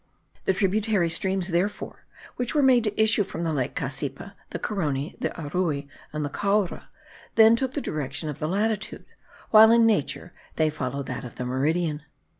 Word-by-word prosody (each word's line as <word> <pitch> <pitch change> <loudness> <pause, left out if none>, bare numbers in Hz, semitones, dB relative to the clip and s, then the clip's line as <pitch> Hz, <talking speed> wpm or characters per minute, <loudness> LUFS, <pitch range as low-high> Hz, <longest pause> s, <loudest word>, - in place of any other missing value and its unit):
The 190 - +3
tributary 200 -2 +1
streams, 190 +1 +1
therefore, 180 +4 -2 0.3
which 245 +4 -3
were 295 - +4
made 255 -3 +5
to 210 0 -2
issue 220 -1 +4
from 170 -3 -6
the 165 -1 -1
lake 130 -4 -2
Cassipa, 140 +6 -4 0.2
the - - -4
Carony, 150 -8 -2
the - - -1
Arui, 150 -2 -2 0.2
and 150 -1 -3
the - - -3
Caura, 200 +3 -1 0.5
then 225 0 +7
took 260 +2 -2
the 290 - -1
direction 150 - -3
of 150 - -5
the 155 - -1
latitude, 210 +4 -2 0.5
while 220 0 +9
in 230 0 +6
nature 200 -4 0 0.2
they 155 -1 +2
follow 140 -1 -3
that - - -5
of 120 - -10
a 125 - -2
meridian. 150 +5 0
175 Hz, 175 wpm, -25 LUFS, 150-215 Hz, 0.5 s, while